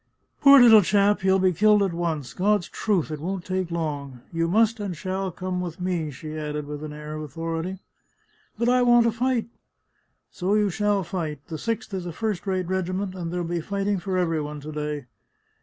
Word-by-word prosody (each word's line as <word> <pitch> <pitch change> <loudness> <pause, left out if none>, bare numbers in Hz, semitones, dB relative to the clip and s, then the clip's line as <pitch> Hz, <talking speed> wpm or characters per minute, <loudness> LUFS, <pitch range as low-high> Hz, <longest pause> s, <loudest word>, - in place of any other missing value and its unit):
" - - -45
Poor 280 -1 +9
little 225 -3 +9
chap, 205 +2 +3
he'll 190 0 +4
be 185 -1 +3
killed 210 +3 +4
at 190 -3 -1
once! 165 -6 -3
God's 200 -1 +1
truth, 190 -8 -1
it 155 - -4
won't 180 +3 -4
take 185 -1 -2
long! 145 -6 -4
You 165 0 +1
must 225 +5 +3
and 195 -5 -4
shall 190 +3 -2
come 180 +1 -4
with 175 -2 -6
me," 180 -4 -1
she 155 +3 -8
added 150 -1 -4
with 150 +1 -6
an 155 - -6
air 150 0 -7
of 155 - -5
authority. 165 +4 -4 0.4
" - - -38
But 235 - 0
I 250 +1 +4
want 240 -1 +6
to 230 - +2
fight." 245 +1 0 0.5
" - - -43 0.3
So 190 +3 0
you 210 -2 +2
shall 205 0 +1
fight! 160 -5 -4
The 160 -2 -5
Sixth 230 -1 -3
is 185 -2 -3
a - - -4
first 210 +2 -3
rate 185 -2 -1
regiment, 185 +1 -2
and 175 -3 -5
there'll 175 -1 -2
be 170 0 -2
fighting 200 +2 -1
for 185 +1 -2
every 165 -3 +1
one 150 0 -6
to 155 +2 -7
day." 150 -2 -4
180 Hz, 215 wpm, -25 LUFS, 160-205 Hz, 0.5 s, Poor